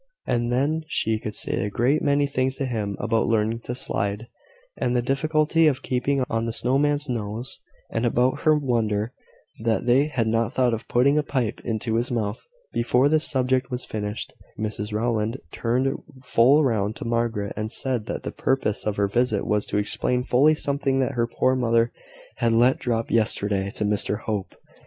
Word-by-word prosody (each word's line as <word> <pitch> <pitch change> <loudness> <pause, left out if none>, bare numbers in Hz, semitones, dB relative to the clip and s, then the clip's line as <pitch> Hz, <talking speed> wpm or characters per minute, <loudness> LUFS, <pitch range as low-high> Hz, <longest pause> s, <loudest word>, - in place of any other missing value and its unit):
And 120 0 0
then 145 +6 +1
she 110 -7 0
could 105 -1 -6
say - - -1
a 105 - -1
great 125 +8 +1
many 145 0 +2
things 130 -1 -1
to 135 - -2
him 105 -6 -3
about 110 +1 +1
learning 115 0 +1
to 125 - -3
slide, 105 -4 -2 0.5
and 125 - -1
the 120 - +3
difficulty 155 +4 +2
of 135 -3 0
keeping 130 +2 0
on 115 0 -1
the 115 - -2
snow 125 +4 +2
man's 145 0 +1
nose, 115 0 -4 0.3
and 115 - -1
about 125 +3 +2
her 155 0 +4
wonder 115 -4 0 0.5
that 110 -1 0
they 130 +4 +4
had 130 -6 -1
not 115 +1 0
thought 125 -2 +2
of 110 - -4
putting 140 +5 +3
a - - +3
pipe 130 -6 -2
into 110 0 -1
his 120 +2 0
mouth. 110 -4 -3 0.3
Before 125 +3 +3
this 155 +1 +2
subject 130 -1 +1
was 125 0 -3
finished, 105 -1 -4 0.3
Mrs 105 0 -3
Rowland 110 +1 0
turned 130 +3 0 0.3
full 130 +5 +4
round 110 -4 0
to - - -7
Margaret, 115 -3 -1
and 110 +1 -3
said 125 -5 -2
that - - -4
the - - -4
purpose 130 -7 -1
of 105 - 0
her 100 -1 +1
visit 110 -1 0
was 105 -1 0
to - - -1
explain 125 +4 0
fully 140 +5 +4
something 140 -2 0
that 130 - 0
her 120 -1 0
poor 130 +2 +1
mother 115 -2 +2 0.5
had 115 - +2
let 120 +3 +4
drop 115 -2 -1
yesterday 100 -3 +1
to 105 - -1
Mr 105 0 -1
Hope. 105 -3 -3
120 Hz, 185 wpm, -24 LUFS, 110-130 Hz, 0.5 s, her